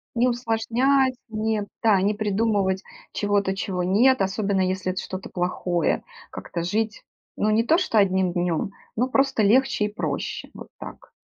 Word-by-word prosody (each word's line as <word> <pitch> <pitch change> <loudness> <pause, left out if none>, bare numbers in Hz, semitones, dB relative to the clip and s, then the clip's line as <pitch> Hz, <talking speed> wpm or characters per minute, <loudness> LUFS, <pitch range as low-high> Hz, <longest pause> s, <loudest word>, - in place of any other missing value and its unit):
Не 245 +2 +3
усложнять, 245 +3 +1 0.2
не 215 -1 -1 0.2
да 210 -4 +4
не 205 +2 +2
придумывать 205 -2 0 0.3
чего-то, 205 -2 0
чего 185 -2 -2
нет. 235 +8 +4
Особенно 195 0 0
если 185 0 -1
это 185 - -4
что-то 185 0 -7
плохое, 175 -1 -1 0.3
как-то 170 - -5
жить, 215 +5 -2 0.3
ну, 210 - +1
не 220 +2 +3
то 315 +8 +3
что 345 - +2
одним 190 -2 +2
днем, 175 +1 -1 0.2
но 245 +3 +1
просто 270 -3 +2
легче 235 +1 +3
и 210 - -5
проще, - - -4
вот - - -10
так. - - -10
210 Hz, 155 wpm, -24 LUFS, 190-230 Hz, 0.3 s, да